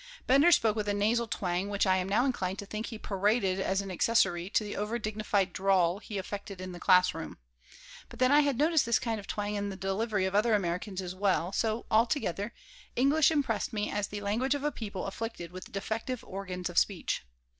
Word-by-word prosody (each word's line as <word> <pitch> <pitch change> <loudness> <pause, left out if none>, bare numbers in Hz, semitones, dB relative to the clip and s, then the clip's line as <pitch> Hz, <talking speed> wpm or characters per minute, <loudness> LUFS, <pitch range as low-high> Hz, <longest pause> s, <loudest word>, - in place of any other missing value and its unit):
Bender 280 +7 +5
spoke 220 -9 +4
with 210 -2 -2
a 205 - +1
nasal 225 +3 +1
twang 185 -3 -2
which 205 0 +1
I 190 -1 +3
am 185 0 -2
now 220 +6 +3
inclined 195 -8 -1
to 200 - -6
think 215 +2 -5
he 225 - -6
paraded 200 -1 0
as 190 +1 0
an 195 -1 -6
accessory 185 -3 +2
to 215 - +1
the 210 - -5
over 210 +3 -2
dignified 215 -4 -1
drawl 190 -1 +2
he 210 -1 -6
affected 200 0 -6
in 185 0 -6
the 175 - -8
class 180 +1 +5
room. - - -7 0.7
But - - -12
then 255 +1 +3
I 290 - +7
had 285 -4 +2
noticed 310 +1 +3
this 235 - +4
kind 225 -2 -2
of 200 - -11
twang 205 0 -2
in 205 -1 -2
the 195 - -5
delivery 195 +1 -1
of 190 - -2
other 215 +2 +3
Americans 190 +1 -2
as 180 0 -5
well, 185 -2 +1
so, 220 +2 -1
altogether, 220 - +1 0.4
English 280 +4 +4
impressed 275 -11 0
me 210 -1 -1
as 205 -1 -1
the 205 0 -6
language 235 +7 0
of 285 - -4
a 295 - +1
people 205 -7 -5
afflicted 195 -4 -5
with 185 0 -9
defective 220 +5 -3
organs 185 -2 -5
of 175 - +3
speech. 195 -4 -1
205 Hz, 215 wpm, -30 LUFS, 190-230 Hz, 0.7 s, I